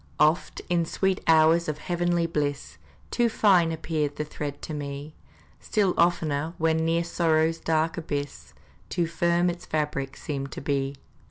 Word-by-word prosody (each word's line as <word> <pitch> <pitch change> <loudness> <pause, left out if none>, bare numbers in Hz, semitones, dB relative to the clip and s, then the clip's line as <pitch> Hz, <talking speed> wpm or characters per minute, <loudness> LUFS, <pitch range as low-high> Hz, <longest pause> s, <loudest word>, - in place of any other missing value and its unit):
Oft, 155 +3 +2
in 175 -1 +2
sweet 190 +3 0
hours 160 +1 +5
of 155 -1 -2
heavenly 175 0 0
bliss, 145 - -3 0.3
Too 240 -1 +2
fine 185 -7 +4
appeared 155 -2 -2
the 150 - -3
thread 145 -1 -5
to 155 - -5
me; 145 +1 -5 0.5
Still 200 -5 +1
oftener, 160 -2 +1
when 160 0 +2
near 165 +1 +1
sorrow's 165 -1 +1
dark 160 0 0
abyss, 145 -3 -5 0.3
Too 175 -1 0
firm 170 +1 +1
its 175 0 -4
fabric 150 -3 -2
seemed 140 -2 -4
to - - -6
be. 140 -1 -1
160 Hz, 150 wpm, -26 LUFS, 145-170 Hz, 0.5 s, hours